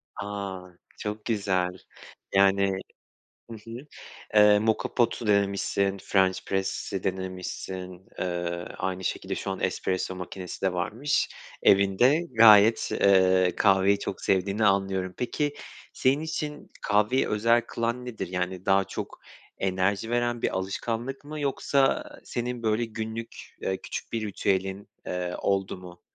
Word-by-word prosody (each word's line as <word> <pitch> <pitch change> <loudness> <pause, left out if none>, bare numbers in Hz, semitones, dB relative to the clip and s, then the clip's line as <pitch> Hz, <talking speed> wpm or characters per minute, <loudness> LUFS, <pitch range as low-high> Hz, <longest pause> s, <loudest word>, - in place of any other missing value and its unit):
A, 100 -2 -5 0.4
çok 105 0 -5
güzel! 100 -5 +1 0.7
Yani, 100 0 +4 0.8
hı 115 - -7
hı. 115 +1 -8 0.6
Eee, 105 0 +7
moka 110 +1 0
pot'u 120 -2 +1
denemişsin, 100 -1 +1
french 95 -1 +2
press'i 95 0 -2
denemişsin, 95 0 -5
Eee 85 -1 -2
aynı 95 0 -3
şekilde - - -2
şu - - -4
an - - -4
espresso 95 0 -1
makinesi 90 0 -7
de 95 - +2
varmış 115 +11 0 0.3
evinde. 100 - +4 0.2
Gayet, 110 0 +7
eee, 95 -2 +4
kahveyi 100 0 +4
çok 100 - -5
sevdiğini 100 +3 +1
anlıyorum. 95 -2 +1
Peki, 145 +4 -1 0.4
senin 135 +3 +2
için 150 -2 -4
kahveyi 105 +6 +2
özel 115 +3 +3
kılan 120 +2 -2
nedir? 120 -3 -4
Yani, 90 +1 -3
daha 95 0 +4
çok - - -7 0.4
enerji 95 +3 0
veren 120 0 0
bir - - 0
alışkanlık 115 +8 -3
mı 150 +1 -6
yoksa 140 -1 +1 0.2
senin 120 0 -4
böyle 110 +1 +1
günlük, 110 0 -7
eee, 95 - -1
küçük - - -6
bir 110 -2 -1
ritüelin, 95 0 -1 0.2
eee, 90 0 -3
oldu 95 -1 0
mu? 90 -1 -12
100 Hz, 125 wpm, -27 LUFS, 95-115 Hz, 0.8 s, Eee